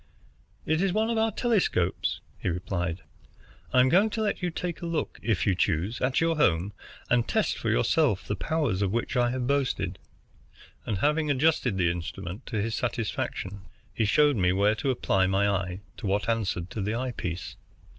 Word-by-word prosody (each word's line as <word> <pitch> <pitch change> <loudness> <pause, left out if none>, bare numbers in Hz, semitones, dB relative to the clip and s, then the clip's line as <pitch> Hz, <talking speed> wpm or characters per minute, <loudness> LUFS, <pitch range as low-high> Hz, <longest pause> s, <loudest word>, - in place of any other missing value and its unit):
"It 160 +2 +1
is 195 -1 +2
one 220 +2 +1
of 225 - +1
our 225 0 +2
telescopes," 195 - 0 0.2
he - - -1
replied. 90 -1 -3 0.7
"I 125 - +5
am 130 - +4
going 195 +8 +4
to 220 +1 -2
let 205 - -1
you 180 - 0
take 175 0 -4
a 170 - -3
look, 165 -2 -2
if 110 -6 0
you 95 - +3
choose, 95 +5 0
at 130 0 +2
your 165 -1 +1
home, 95 - +2 0.4
and 120 -1 +3
test - - +1
for - - -2
yourself - - +2
the - - -2
powers 145 -12 -1
of 100 -2 +1
which 120 +5 -2
I 120 -1 +3
have 125 0 -2
boasted;" 140 -1 0 0.9
and 105 - 0
having 150 - +1
adjusted 135 -6 +2
the 85 -2 +3
instrument 90 +4 -6
to 110 - -2
his 110 +2 -1
satisfaction, 105 -4 -3 0.3
he 110 - +1
showed 145 +4 +4
me 90 -2 +3
where 100 +3 +3
to 110 +6 -2
apply 95 -7 +2
my 95 +2 +2
eye 95 -1 -1 0.2
to - - -4
what 100 +2 0
answered 100 -6 -1
to 115 -4 -4
the 105 +3 -1
eye 130 +1 -2
piece. 90 -6 -5
115 Hz, 190 wpm, -27 LUFS, 95-150 Hz, 0.9 s, I